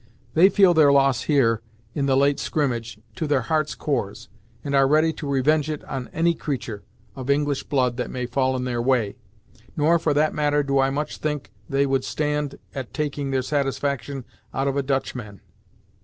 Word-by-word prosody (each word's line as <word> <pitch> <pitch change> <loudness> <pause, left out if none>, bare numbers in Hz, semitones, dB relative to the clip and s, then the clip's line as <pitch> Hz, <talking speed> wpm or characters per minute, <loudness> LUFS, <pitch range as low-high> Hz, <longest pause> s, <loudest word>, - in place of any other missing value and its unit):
They 180 +4 +6
feel 195 -3 +5
their 155 -3 +6
loss 135 -3 +3
here, 115 -7 +3 0.3
in 140 -2 -1
the 135 -1 +3
late 140 +1 +3
skrimmage, 120 -7 -2 0.2
to 160 - -2
their 145 -3 +2
hearts' 155 +4 0
cores, 105 -9 -3 0.3
and 140 - -3
are 135 -1 +5
ready 155 +3 +3
to 150 -2 -6
revenge 145 +3 +2
it 150 -1 -4
on 130 -2 -5
any 170 +1 +2
creatur' 125 -10 -4 0.3
of 130 0 -7
English 145 0 +1
blood 125 -4 0
that 125 - -3
may 125 -1 -3
fall 130 +1 0
in 125 - -2
their 120 -2 -1
way. 120 -5 +1 0.6
Nor, 160 +3 +4
for 155 -3 0
that 155 +1 +2
matter 145 -1 +1
do 140 -1 +1
I 135 0 +3
much 145 +2 -3
think 150 -2 -3 0.2
they 140 -1 +2
would 135 -2 +1
stand 150 -1 -2 0.2
at 130 -3 -6
taking 145 -2 -2
their 130 -1 0
satisfaction 140 -1 -2 0.3
out 135 +1 0
of 135 - 0
a 140 - +1
Dutch 135 0 -1
man." 105 -6 -8
140 Hz, 190 wpm, -23 LUFS, 130-150 Hz, 0.6 s, They